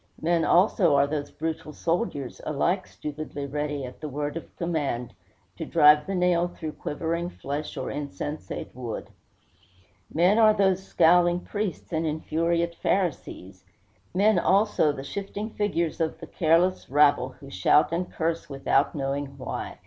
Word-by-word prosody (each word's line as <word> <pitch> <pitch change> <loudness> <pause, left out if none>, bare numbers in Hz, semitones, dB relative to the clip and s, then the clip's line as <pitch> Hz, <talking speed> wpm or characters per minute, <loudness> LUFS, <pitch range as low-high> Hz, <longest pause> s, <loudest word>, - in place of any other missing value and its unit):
Men 170 0 +1
also 175 -3 +4
are 140 0 +5
those 145 0 -3
brutal 160 -1 -5
soldiers, 165 - -2
alike 170 +6 0
stupidly 150 -1 -6
ready, 145 0 -3
at 125 +3 -11
the 155 - -4
word 145 +2 -3
of 165 - -8
command, 145 -8 -2 0.4
to - - -4
drive 150 0 +5
the 195 - -2
nail 180 -1 +2
through 160 -3 -6
quivering 170 +4 -3
flesh 145 -2 -5
or - - -3
insensate 145 +1 -5
wood. 120 -3 -6 1.0
Men 180 +7 +3
are 215 -1 +6
those 190 -2 +2
scowling 175 -1 +4
priests 205 -4 -4
and 160 0 0
infuriate 170 +2 0
Pharisees. 145 - -2 0.5
Men, 200 +1 +3
also, 195 -5 +3
the 135 -2 -7
shifting 200 +6 -5
figures 180 -7 -1
of 160 0 -1
the 165 - -8
careless 170 +3 +1
rabble, 140 -2 +3
who 140 - -12
shout 95 +12 +3
and 175 +2 -2
curse 165 -1 -2
without 140 +1 +1
knowing 140 0 -2
why. 130 - -5
160 Hz, 145 wpm, -26 LUFS, 145-180 Hz, 1.0 s, are